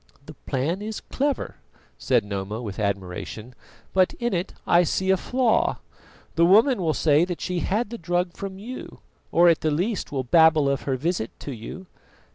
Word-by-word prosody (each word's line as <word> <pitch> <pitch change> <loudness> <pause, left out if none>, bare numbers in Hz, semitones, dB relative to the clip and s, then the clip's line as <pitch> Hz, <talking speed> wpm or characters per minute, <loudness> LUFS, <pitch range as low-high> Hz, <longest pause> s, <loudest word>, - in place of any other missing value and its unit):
"The 155 - -10
plan 150 +7 -2
is 215 0 -4
clever," 280 0 -2 0.4
said - - +1
Noma 100 +1 -4
with 110 -3 -6
admiration, 100 +3 -4 0.4
"but 185 -1 +3
in 240 -2 -2
it 175 0 -2
I 175 - +5
see 190 +2 +1
a - - +5
flaw. 245 +3 +1 0.6
The 170 - +3
woman 215 +6 +5
will 160 -3 +1
say 150 0 +4
that 175 -1 -3
she 180 -1 -2
had 210 +5 -1
the 235 - -6
drug 175 +1 -1
from 195 -1 -6
you, 235 +6 -9 0.3
or, 175 +1 +5
at 165 -2 +4
the 155 - +1
least, 185 +8 -1
will 135 -2 -1
babble 160 +2 +5
of 140 0 0
her 130 - +1
visit 155 -4 -1
to 145 - -6
you." 120 - -8
170 Hz, 180 wpm, -24 LUFS, 135-190 Hz, 0.6 s, I